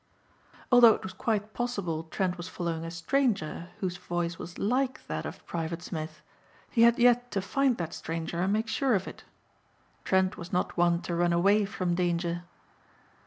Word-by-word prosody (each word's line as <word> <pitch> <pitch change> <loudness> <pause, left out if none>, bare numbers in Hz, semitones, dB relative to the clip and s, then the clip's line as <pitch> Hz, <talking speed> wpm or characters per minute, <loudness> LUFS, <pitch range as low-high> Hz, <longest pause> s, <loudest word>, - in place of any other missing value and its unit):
Although 240 -3 +8
it - - -9
was 190 - -6
quite 220 -4 -1
possible 195 -10 -2
Trent 180 +2 -1
was 175 0 -7
following 170 -3 -3
a 165 - -4
stranger 170 - -1
whose 180 -2 -2
voice 175 -1 -3
was 175 +2 -8
like 255 +5 0
that - - -3
of - - -10
Private 165 0 -4
Smith, 155 -3 -6 0.5
he 230 - +2
had 235 0 +6
yet 245 0 +4
to 200 - +1
find 260 +6 +1
that 165 -1 -4
stranger 165 +1 -4
and 190 +2 +1
make 220 +2 0
sure 255 +1 +2
of 190 -1 -1
it. - - -9 0.8
Trent 190 0 +2
was 170 +1 -8
not 180 - 0
one 175 -1 +2
to 175 - -3
run 175 0 +2
away 200 +4 +4
from 185 -3 -2
danger. 175 -1 -1
180 Hz, 175 wpm, -29 LUFS, 170-220 Hz, 0.8 s, Although